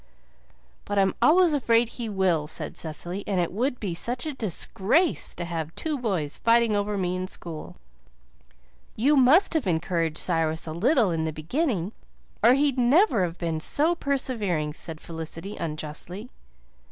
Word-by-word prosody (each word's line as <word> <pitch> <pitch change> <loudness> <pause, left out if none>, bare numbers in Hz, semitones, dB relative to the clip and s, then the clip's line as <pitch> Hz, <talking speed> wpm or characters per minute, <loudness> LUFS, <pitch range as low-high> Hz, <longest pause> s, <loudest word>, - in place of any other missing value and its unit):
"But 205 - -3
I'm 195 -1 +3
always 345 0 +5
afraid 235 -4 +2
he 235 -2 -6
will," 185 -6 +1
said 155 - -3
Cecily, 175 +5 -4
"and 195 -3 0
it 175 - 0
would 245 +5 -1
be 195 -5 -3
such 245 - -2
a 305 - -3
DISGRACE 230 - 0
to 175 - -4
have 165 -2 -5
two 315 -2 -2
boys 190 - -2
fighting 230 -2 +3
over 205 0 -1
me 180 -1 -1
in 185 0 -3
school." 165 -4 -6 1.2
"You 275 +7 +3
must 285 +10 +5
have 315 -10 0
encouraged 165 -2 0
Cyrus 165 -2 0
a 160 - -5
little 225 - +2
in 160 -1 -1
the 160 - -1
beginning 190 - -2 0.5
or 240 +3 +7
he'd 275 -2 +1
never 255 - +4
have 170 -1 -3
been 165 -2 -2
so 305 - +2
persevering," 225 - -1
said 160 0 -3
Felicity 165 +5 -6
unjustly. 165 +8 -6
195 Hz, 155 wpm, -25 LUFS, 165-250 Hz, 1.2 s, or